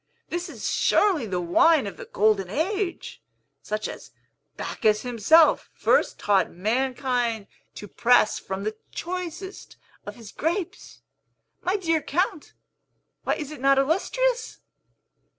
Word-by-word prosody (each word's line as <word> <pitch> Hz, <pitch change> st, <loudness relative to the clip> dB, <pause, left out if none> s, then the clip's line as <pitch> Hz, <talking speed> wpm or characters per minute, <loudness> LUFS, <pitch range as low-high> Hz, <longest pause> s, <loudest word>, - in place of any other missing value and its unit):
This 345 Hz, +1 st, -3 dB
is -, -, -5 dB
surely 365 Hz, -, +2 dB
the 185 Hz, -3 st, -2 dB
wine 255 Hz, -, +4 dB
of 200 Hz, -, -6 dB
the -, -, -9 dB
Golden 205 Hz, -3 st, +1 dB
Age, 360 Hz, -, -3 dB, 0.4 s
such 215 Hz, 0 st, -3 dB
as -, -, -9 dB, 0.5 s
Bacchus 215 Hz, -1 st, 0 dB
himself 250 Hz, +7 st, +4 dB
first -, -, +2 dB
taught 200 Hz, -2 st, +2 dB
mankind 240 Hz, +2 st, -1 dB, 0.3 s
to 205 Hz, -, -8 dB
press 235 Hz, +2 st, +3 dB
from 190 Hz, +1 st, -5 dB
the 215 Hz, +1 st, -3 dB, 0.2 s
choicest 365 Hz, +2 st, -6 dB, 0.3 s
of 205 Hz, -, -6 dB
his 225 Hz, -4 st, -12 dB
grapes. 340 Hz, +3 st, -4 dB, 0.6 s
My 370 Hz, +2 st, 0 dB
dear 330 Hz, -5 st, 0 dB
Count, 320 Hz, 0 st, -2 dB, 0.7 s
why -, -, +1 dB
is 300 Hz, -1 st, -6 dB
it 300 Hz, -, -9 dB
not 275 Hz, 0 st, +4 dB
illustrious? 460 Hz, -, 0 dB
270 Hz, 125 wpm, -25 LUFS, 215-345 Hz, 0.7 s, wine